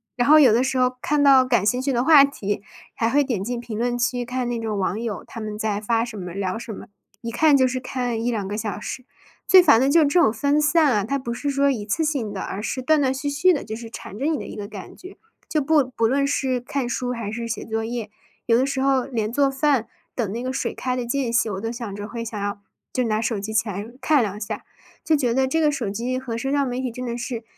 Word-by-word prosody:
然 245 +3 +1
后 310 0 +9
有 250 -7 +6
的 245 +3 +3
时 265 0 -1
候 250 0 +2
看 295 0 +1
到 270 -2 +7
感 240 -6 +1
兴 250 +3 +2
趣 275 +1 0
的 245 0 +1
话 295 -2 +8
题， 205 -8 -2 0.3
还 225 0 0
会 285 +3 +3
点 230 -8 -2
进 240 +2 -3
评 230 -2 -6
论 245 0 0
区 245 0 0
看 250 0 -3
那 240 -1 -2
种 220 -2 -3
网 190 +2 -1
友 225 -4 -4
他 230 - -8
们 210 -1 -5
在 210 -1 -1
发 230 +1 +1
什 225 -3 -8
么、 180 -2 -6
聊 195 +2 -2
什 235 - -7
么， - - -8 0.4
一 230 0 -5
看 290 +3 +4
就 260 -1 +4
是 255 0 -2
看 245 -3 -3
1-2 220 -5 -1
个 205 - -4
小 210 -2 -3
时。 255 +3 -6 0.4
最 370 -1 +8
烦 225 -7 +6
的 270 - +3
就 320 +3 +5
是 - - +5
这 340 +5 +3
种 220 - +4
分 285 +4 +1
散 300 -1 +4
啊， 205 -3 +1
它 275 +6 -1
不 235 -3 -4
是 285 +4 -3
说 280 0 +2
一 230 -6 -3
次 215 +10 -1
性 270 -9 -1
的， 195 - -5
而 195 - -4
是 255 - -3
断 305 +2 +3
断 260 - +2
续 265 +2 -4
续 285 +6 +3
地， 290 - -2
就 220 - -6
是 230 0 -8
缠 215 -2 -9
着 280 - -2
你 315 -2 +1
的 - - -6
一 - - -8
个 205 -1 -6
感 200 -3 -10
觉。 370 +2 -12 0.3
就 310 - +1
不 295 +1 +3
不 250 -3 -2
论 275 +3 +1
是 265 -3 0
看 250 +1 -3
书 250 0 -2
还 230 -4 -4
是 230 +1 -4
写 225 - -4
作 225 0 -2
业， 225 -2 -4 0.3
有 230 - +3
的 255 +3 +2
时 270 -1 -1
候 270 -2 +2
连 220 -3 -2
做 280 +1 +3
饭 270 -4 +1 0.3
等 220 -6 -1
那 235 +3 -4
个 255 +1 -3
水 - - -2
开 255 -1 -2
的 250 - -3
间 245 0 -1
隙， 235 - +3
我 190 - -4
都 225 - -3
想 235 -4 -6
着 205 +1 -6
会 230 -1 -5
想 220 -2 -5
要 205 0 -3 0.3
就 255 - +1
拿 215 -2 0
手 225 -1 -1
机 220 +2 -5
起 225 +1 +1
来 200 +2 -4 0.2
看 300 -3 +3
两 205 0 -4
下， 205 - -5 0.4
就 320 - +1
觉 250 -5 +1
得 265 +1 +2
这 320 +5 0
个 300 - +4
手 260 -8 -3
机 245 +5 -2
和 255 -3 -5
社 270 +3 -2
交 280 -1 +2
媒 250 0 -3
体 255 - -2
真 250 +2 -6
的 235 -1 -3
是 240 -2 -5
245 Hz, 295 characters per minute, -23 LUFS, 220-275 Hz, 0.4 s, 后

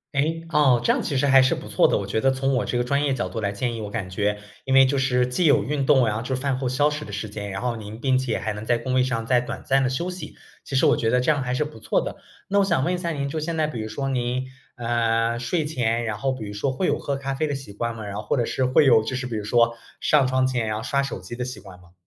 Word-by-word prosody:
诶， 160 +4 0
哦， 145 -6 +4
这 - - +3
样 - - +1
其 140 - -3
实 135 +2 +2
还 135 -1 +7
是 130 - +3
不 - - -9
错 - - +4
的。 - - +2
我 100 - -3
觉 100 +3 -1
得 135 +4 +3
从 135 +1 0
我 125 - 0
这 120 - -1
个 120 - +1
专 140 +3 0
业 140 - +1
角 - - -2
度 115 - -5
来 100 -2 -1
建 120 +4 -2
议， - - -5
我 105 - -5
感 100 -3 -4
觉 105 +2 -1 0.3
因 130 - 0
为 135 0 +8
就 140 +2 0
是 125 -2 +2
既 125 +8 0
有 140 -9 +5
运 140 +4 -1
动 135 -3 +5
呀， 110 0 -1
就 130 +2 -2
是 130 - -4
饭 135 -2 0
后 130 - -1
消 140 +4 +2
食 150 0 -5
的 - - -9
时 110 - -4
间， 100 0 -6
然 95 0 -4
后 120 -2 -1
您 105 0 -8
并 130 -2 +3
且 130 -3 -1
还 110 - -3
能 105 +1 -6
在 120 +1 +2
工 130 +2 -3
位 130 0 +4
上 115 -3 -2
再 125 +1 +3
短 120 - -6
暂 135 +1 +2
地 - - +1
休 170 +8 -2
息， 180 - -8 0.3
其 135 - -5
实 130 - +4
我 - - +4
觉 115 - 0
得 125 +2 +3
这 125 - +3
样 145 -2 0
还 125 -1 -2
是 130 - +1
不 150 -6 -9
错 - - +1
的。 - - -6 0.3
那 200 +1 +3
我 200 - +4
想 170 -8 +1
问 175 - +1
一 - - 0
下 170 -1 -3
您， 140 -3 -2
就 155 - -3
现 165 +2 -3
在 155 -1 +1
比 125 -7 -5
如 110 - -3
说 135 +5 -3
您， 125 0 -1 0.3
呃， 115 -1 0
睡 140 +7 -1
前， 120 -6 0
然 110 -2 -3
后 135 +3 0
比 120 -4 -6
如 100 - -6
说 105 +7 -2
会 180 +8 -1
有 - - +1
喝 140 - -2
咖 135 0 -3
啡 155 +3 -1
的 145 - -2
习 135 -6 -8
惯 115 +3 -3
吗？ 110 - -7
然 100 0 -5
后 - - -3
或 105 - 0
者 125 - +1
是， 130 - 0
会 130 +3 +4
有 120 -4 +6
就 130 - -3
是 125 0 -3
比 120 - -4
如 105 - -4
说 115 +1 +3 0.2
上 145 -4 +4
床 130 0 +2
前 125 -4 -1
要 110 +1 -2
刷 140 +3 +1
手 135 -8 -4
机 95 +7 -8
的 125 - -2
习 125 - -7
惯 95 -3 -13
吗？ 85 -1 -20
125 Hz, 350 characters per minute, -24 LUFS, 115-140 Hz, 0.3 s, 为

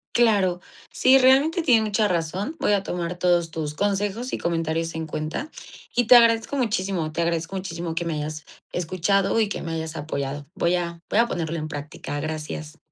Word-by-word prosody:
Claro. 200 -7 +3 0.3
Sí, 260 +1 +5
realmente 275 +6 +4
tiene 240 -8 +5
mucha 210 0 +2
razón. 185 - -2
Voy 210 - +2
a 200 -1 +1
tomar 175 0 -3
todos 175 -2 +2
tus 155 -2 -4
consejos 205 +6 -1
y - - -1
comentarios 165 -1 -1
en 160 -1 -4
cuenta 155 - -4 0.5
y 245 -1 +3
te 250 - +8
agradezco 230 +3 +5
muchísimo. 190 - -1
Te 170 +2 -1
agradezco 170 +2 -2
muchísimo 170 -3 -4
que 170 - -2
me 165 - -1
hayas 155 +1 -4 0.3
escuchado 185 +5 +1
y 215 -2 +2
que - - -4
me 165 - -4
hayas 160 0 -4
apoyado. 145 -2 -4
Voy 180 -2 +1
a 170 -1 -3
voy - - 0
a 235 - +6
ponerlo 165 -5 -3
en 155 0 -4
práctica. 145 -1 -6
Gracias. 155 0 -5
175 Hz, 185 wpm, -24 LUFS, 160-205 Hz, 0.5 s, te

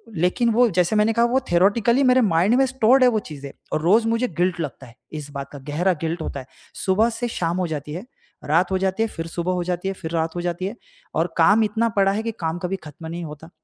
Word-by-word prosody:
लेक़िन 180 +8 +1
वो 240 +1 +4
जैसे 180 +3 +1
मैंने 215 +2 +3
कहा 235 +1 +3
वो 255 +3 +2
थियोरेटिकली 220 +8 +3
मेरे 255 0 +5
माइंड 195 +3 +3
में 270 +1 +4
स्टोर्ड 260 0 +4
है 250 - +7
वो 220 -2 +1
चीज़ें। 140 -2 -8 0.2
और 155 - 0
रोज़ 220 +7 +4
मुझे 230 +2 +1
गिल्ट 180 0 +1
लगता 135 -3 -6
है 115 - -17 0.2
इस 145 0 -9
बात 140 -1 -6
का 145 - -9
गहरा 175 +5 +1
गिल्ट 165 +1 -2
होता 140 - -4
है। - - -13 0.4
सुबह 210 +5 +3
से 240 +1 -3
शाम 170 -3 -2
हो 180 -2 0
जाती 150 -1 -5
है, 185 +8 -6 0.4
रात 170 +5 +2
हो 190 - +2
जाती 190 +3 0
है, - - 0
फ़िर 165 0 -6
सुबह 175 +2 -2
हो 180 -1 -1
जाती 180 +1 -3
है, 195 - -1
फ़िर 165 -3 -7
रात 165 0 -1
हो 175 - -2
जाती 175 +1 -3
है 220 - -6 0.4
और 165 +1 0
काम 205 +7 +5
इतना 220 +2 0
पड़ा 195 0 +4
है 220 +2 -2
कि 230 - -2
काम 165 0 -2
कभी 185 +2 -1
ख़त्म 155 +2 -10
नहीं 170 +1 -5
होता। 150 +2 -10
180 Hz, 255 wpm, -22 LUFS, 165-225 Hz, 0.4 s, है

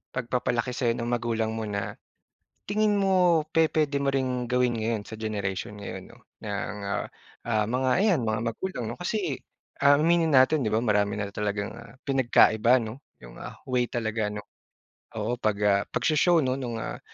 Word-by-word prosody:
pagpapalaki 125 0 -1
sa'yo 120 -2 0
ng 120 0 -3
magulang 115 -2 -1
mo 110 - -3
na 100 -1 -3 0.7
tingin 210 0 +2
mo 180 -5 +3
pe-pwede 155 -3 +2
mo 140 - 0
ring 130 -2 -1
gawin 125 -1 +1
ngayon 110 -1 -1
sa 110 - -9
generation 105 -1 -3
ngayon 95 -2 -7
'no 120 - -17 0.3
ng 105 0 -3
nga, 100 - -2 0.5
ah, 110 -2 +2
mga 130 +2 0
ayan 195 - +3
mga 110 0 0
magulang 155 -6 -4
'no. - - -5
Kasi, 180 - -1 0.5
ah, 145 0 +7
aminin 165 0 +3
natin 135 +3 +5
'di 110 - -1
ba 110 - +2
marami 105 -1 +2
na 100 -1 -3
talagang 105 -1 -2 0.3
pinagkaiba 125 -2 +4
'no 115 +4 -6 0.2
yung, - - -12
ah, - - -8
way 125 -1 +1
talaga 110 -2 -1
'no. 105 0 -6 0.7
Oo, 110 +3 -1
pag, 105 -2 +1
ah, 100 -1 +4
pagsho-show 165 +3 +3
nung, 130 -2 -2
ah, 110 - -5
120 Hz, 165 wpm, -27 LUFS, 105-140 Hz, 0.7 s, ah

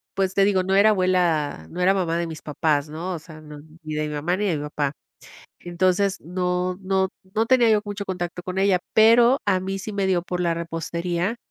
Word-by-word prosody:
Pues 190 -1 0
te 195 0 +4
digo, 195 -2 +2
no 190 +1 0
era 200 +2 +6
abuela, 175 - 0
no 180 - -5
era 185 +2 +4
mamá 175 -4 0
de 170 - -1
mis 160 -2 -8
papás, 150 -1 -1
¿no? 170 +5 -5
O 170 - -5
sea, 155 0 -13
ni 155 +1 -10
de 155 0 -1
mi 150 - -5
mamá 165 +5 -1
ni 210 - -1
de 180 -5 +1
mi - - -5
papá. 150 -1 -2 0.7
Entonces 185 +3 0
no 180 +1 -2
no 190 0 +1 0.3
no 225 +1 +1
tenía 245 -2 +4
yo 215 -1 +4
mucho 205 -1 -5
contacto 175 -2 -4
con 185 +1 -5
ella, 195 -1 +3 0.2
pero 235 +4 +6
a 190 -2 +2
mí 195 +1 -4
sí 210 +3 -6
me 200 -1 -1
dio 180 -2 +1
por 180 0 -4
la 170 -1 +1
repostería 170 +4 -3
180 Hz, 220 wpm, -23 LUFS, 165-195 Hz, 0.7 s, era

